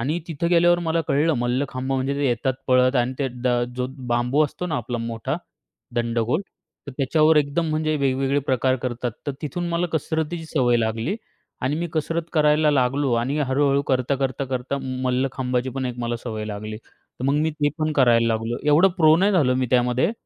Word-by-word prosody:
आणि 150 +8 -1
तिथं 165 +2 -2
गेल्यावर 175 0 +4
मला 165 -1 0
कळलं 150 +3 +2
मल्लखांब 130 +2 -1
म्हणजे, 135 +1 0
ते 140 0 0
येतात 125 +1 0
पळत 130 0 +4
आणि 125 +1 +1
तो 140 - 0
द, 125 - +1 0.3
जो 125 0 -1 0.2
बांबू 125 +5 +2
असतो 180 +5 -5
ना 155 - -2
आपला 120 -1 -3
मोठा, 115 -1 -3 0.6
दंडगोल. 120 +4 0 0.5
तर 140 - -7
त्याच्यावर 155 +3 +3
एकदम 150 +3 +1
म्हणजे 155 0 0
वेगवेगळे 135 0 +1
प्रकार 130 0 +2
करतात. 125 -1 -2 0.2
तर 145 - -1
तिथून 175 +4 -3
मला 170 +1 0
कसरतीची 160 +1 -2
सवय 125 -6 +2
लागली 115 - -1 0.4
आणि 135 +4 0
मी 175 - -1
कसरत 165 +1 -1
करायला 150 -1 +4
लागलो 135 0 +1
आणि, 125 +6 0
हळूहळू 140 0 +2
करता-करता-करता 130 0 -1 0.2
मल्लखांबाची 130 0 -1
पण 130 0 -3
एक 125 0 -5
मला 120 0 -2
सवय 110 -3 -4
लागली. 105 0 -6
तर 125 +2 -13
मग 140 +1 +2
मी 155 +2 +1
ते 150 -1 0
पण 155 0 0
करायला 120 -4 +4
लागलो. 115 +1 -1
एवढं 160 +6 +6
प्रो 155 -2 +6
नाही 200 +3 +3
झालो 135 -8 +3
मी 130 0 0
त्यामध्ये. 125 - +2
135 Hz, 180 wpm, -23 LUFS, 125-155 Hz, 0.6 s, एवढं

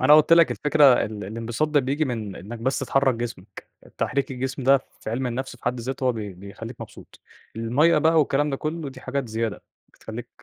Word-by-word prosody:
أنا 145 +4 +7
قُلت 155 +2 +5
لك 170 -1 +7
الفكرة 150 0 +2
ال 105 -4 -1
الانبساط 115 +8 -2
ده 150 -1 +3
بيجي 140 +4 0
من 110 -7 -4
إنك 115 +5 -8
بس 130 +3 0
تحرّك 135 -1 +2
جسمك. 115 -5 -7 0.3
تحريك 140 -1 -1
الجسم 130 +1 -4
ده 135 +1 +5 0.2
في - - -5
علم 130 +3 -1
النفس 125 +1 -4
في - - -22
حد 120 0 -1
ذاته 130 +3 -4
هو 125 - +3
بي 105 -4 -5
بيخليك 100 +6 -10
مبسوط. - - -12 0.4
المَيّة 135 +9 +3
بقى 160 +2 +4
والكلام 145 0 +2
ده 135 - -1
كله 155 +1 -4
دي 130 -1 -12
حاجات 130 -1 -3
زيادة 110 -1 -3 0.3
بتخليك - - -8
130 Hz, 200 wpm, -24 LUFS, 115-145 Hz, 0.4 s, أنا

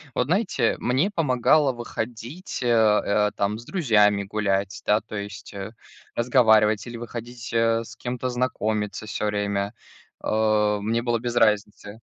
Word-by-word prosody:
Вот, 125 - +1
знаете, 190 +6 +1
мне 130 +10 +1
помогало 145 - +3
выходить, 120 - -6
э 125 - -1
э, 105 -2 +3
там 100 +1 -1
с 120 - -12
друзьями 105 - +3
гулять, 100 +1 -2
да, 105 +1 +3
то - - -10
есть, 100 +1 -7
э, 100 +2 -6 0.4
разговаривать 110 -4 +3
или 120 -1 -7
выходить, 120 0 -7
э, 115 0 +2
с - - -12
кем-то 125 +1 -4
знакомиться 110 -4 -2
всё 105 - -3
время. 100 -1 -1 0.5
А, 105 -1 +1
мне 115 +3 0
было 120 -1 0
без 120 +1 -4
разницы. 105 -1 +1
110 Hz, 145 wpm, -24 LUFS, 105-120 Hz, 0.5 s, помогало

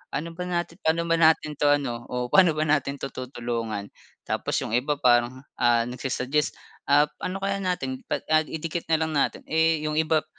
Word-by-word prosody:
"Ano 160 +4 -3
ba 180 +2 -6
natin 175 0 -3
pano 165 -1 +1
ba 165 0 +1
natin 160 -2 +3
'to 145 - +3
ano 120 -5 -4
o 125 0 -3
pano 180 -5 +5
ba 155 - +1
natin 145 -2 +1
to 135 -1 -6
tutulungan?" 115 -5 -4 0.3
Tapos - - -2
yung - - -5
iba 130 +6 +1
parang, 125 -1 +2 0.2
ah, 120 -1 +4
nagsu-suggest, 130 +4 -2 0.3
"Ah 145 +1 +6 0.2
ano 195 +1 -4
kaya 195 0 0
natin 160 -9 -2
pa - - -2 0.2
idikit 165 +1 -4
na 165 - +3
lang 160 0 -1
natin." 145 -2 0
Eh, 160 -1 +1
yung 155 0 0
iba 160 -1 +2
150 Hz, 185 wpm, -25 LUFS, 125-165 Hz, 0.3 s, Ah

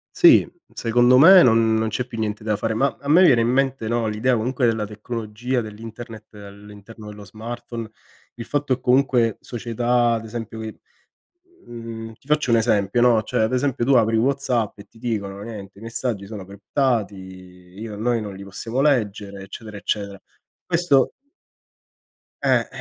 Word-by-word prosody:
Sì, - - +6 0.2
secondo 120 +2 +3
me 180 +7 +9
non 115 -4 +4
non 110 0 +1
c'è 125 - -2
più 115 -2 -8
niente 105 -1 -3
da 105 -1 0
fare, 110 +2 -2
ma 135 +2 +1
a 140 - -6
me 170 +5 +6
viene 130 -10 +5
in 115 - +1
mente, 130 -2 0
no, 120 0 0
l'idea 110 +4 +1
comunque 120 +2 0
della 110 -2 0
tecnologia, 110 +3 -4
dell'internet 110 0 -9
all'interno 105 +1 -12
dello 105 -1 -10
smartphone, 115 +2 -7 0.5
il 115 - -7
fatto, 145 0 0
ehm, 130 - -3
comunque 125 -3 +2
società 120 0 0
ad 115 -1 -2
esempio 110 0 -7
che, 110 -1 -7 0.9
mhmm, 115 -1 -8
ti 120 - -29
faccio 150 -3 +1
un 115 - +5
esempio, 110 -1 +1
no, 120 -2 +4
cioè 110 - -1
ad 110 - 0
esempio 130 -1 0
tu 135 +2 +3
apri 115 -2 +3
WhatsApp 125 -3 0
e - - -14
ti - - -21
dicono: 100 -4 -4
"Niente, 100 -3 -9
i - - -14
messaggi 115 -3 -3
sono 100 -2 -8
criptati, 105 +3 -1
io 95 +2 -11
noi 115 +2 0
non 105 -2 -6
li 95 - -10
possiamo 115 +6 -4
leggere, 105 -8 0
eccetera, 105 +2 -10
eccetera". 100 -1 -3 0.5
Questo 170 -6 +2 1.3
Eh, - - +2
115 Hz, 165 wpm, -22 LUFS, 105-125 Hz, 1.3 s, me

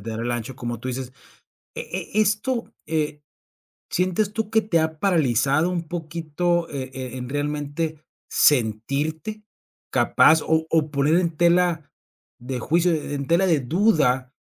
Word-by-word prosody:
dar 110 0 -4
el 120 +1 -2
ancho 120 +2 -4
como 120 -2 -4
tú 125 - -6
dices, 130 0 -4 0.6
e - - -3 0.4
e - - +6
esto, 215 +4 -1
eh, 150 -2 -2 0.7
¿sientes 185 +3 0
tú 220 -1 -3
que 220 0 +4
te 175 -5 +1
ha 160 0 -2
paralizado 150 - +2
un 170 -2 -3
poquito, 170 +1 -2
eh 130 -2 -5
eh, 130 -1 -6
en 125 -1 -6
realmente 145 +2 -3 0.3
sentirte, 145 - +1 0.5
capaz 160 0 +4
o 160 0 +1
o 155 -2 +1
poner 145 +2 +2
en 170 -3 0
tela 170 -2 +2 0.5
de 125 +1 -4
juicio, 170 +7 +2
e 150 -2 -2
en 140 -1 -3
tela 170 +5 +3
de 165 -5 +3
duda, 135 - +2
155 Hz, 150 wpm, -23 LUFS, 135-175 Hz, 0.7 s, e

